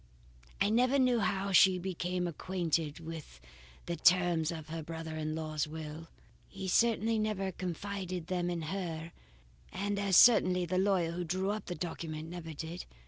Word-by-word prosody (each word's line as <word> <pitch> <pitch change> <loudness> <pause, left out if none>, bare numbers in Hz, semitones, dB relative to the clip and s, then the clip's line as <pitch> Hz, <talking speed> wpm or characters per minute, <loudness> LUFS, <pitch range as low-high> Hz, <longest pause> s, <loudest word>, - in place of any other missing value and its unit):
"I 205 - +2
never 250 +4 +3
knew 250 -3 +3
how 200 -1 0
she 190 0 +6
became 180 0 -2
acquainted 165 -3 -2
with 160 - -8 0.5
the 170 - -2
terms 175 -3 +3
of 160 -2 -7
her 165 0 -4
brother 160 0 -6
in 155 0 -3
law's 155 -1 -2
will. 160 +1 -7 0.4
He 190 -1 -7
certainly 225 +1 +3
never 205 -3 -1
confided 185 0 -4
them 180 0 -1
to 170 -2 -2
her, 165 -2 -4 0.6
and 200 +1 -2
as 195 -3 +3
certainly 185 -6 +6
the 185 +2 0
lawyer 190 -4 +2
who 175 +1 -3
drew 185 +4 -1
up 215 +1 -5
the 175 - -3
document 160 -2 -5
never 170 -2 -7
did. 160 +3 -6
175 Hz, 160 wpm, -32 LUFS, 160-195 Hz, 0.6 s, she